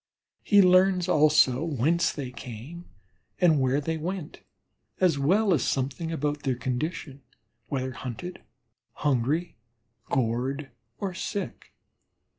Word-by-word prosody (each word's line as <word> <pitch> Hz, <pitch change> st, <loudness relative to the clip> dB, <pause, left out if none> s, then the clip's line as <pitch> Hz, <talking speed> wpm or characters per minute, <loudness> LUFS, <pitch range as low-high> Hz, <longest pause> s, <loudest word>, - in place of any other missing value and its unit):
He 205 Hz, -2 st, +5 dB
learns 185 Hz, 0 st, +4 dB
also 150 Hz, -5 st, +4 dB
whence 165 Hz, +2 st, +1 dB
they 135 Hz, -4 st, -6 dB
came 125 Hz, +8 st, -9 dB, 0.5 s
and 160 Hz, -6 st, +4 dB
where 130 Hz, +2 st, +2 dB
they 160 Hz, +2 st, -2 dB
went, 170 Hz, 0 st, -5 dB, 0.6 s
as 175 Hz, -6 st, +3 dB
well 190 Hz, +8 st, +3 dB
as 155 Hz, -, +1 dB
something 140 Hz, +5 st, -2 dB
about 150 Hz, -2 st, -2 dB
their 130 Hz, -3 st, 0 dB
condition, 135 Hz, +3 st, -4 dB, 0.5 s
whether 130 Hz, -2 st, -2 dB
hunted, 130 Hz, +8 st, -7 dB, 0.5 s
hungry, 145 Hz, +4 st, 0 dB, 0.5 s
gorged, 130 Hz, +3 st, -1 dB, 0.3 s
or 195 Hz, -2 st, -3 dB
sick. 200 Hz, +2 st, -5 dB
150 Hz, 110 wpm, -27 LUFS, 130-175 Hz, 0.6 s, He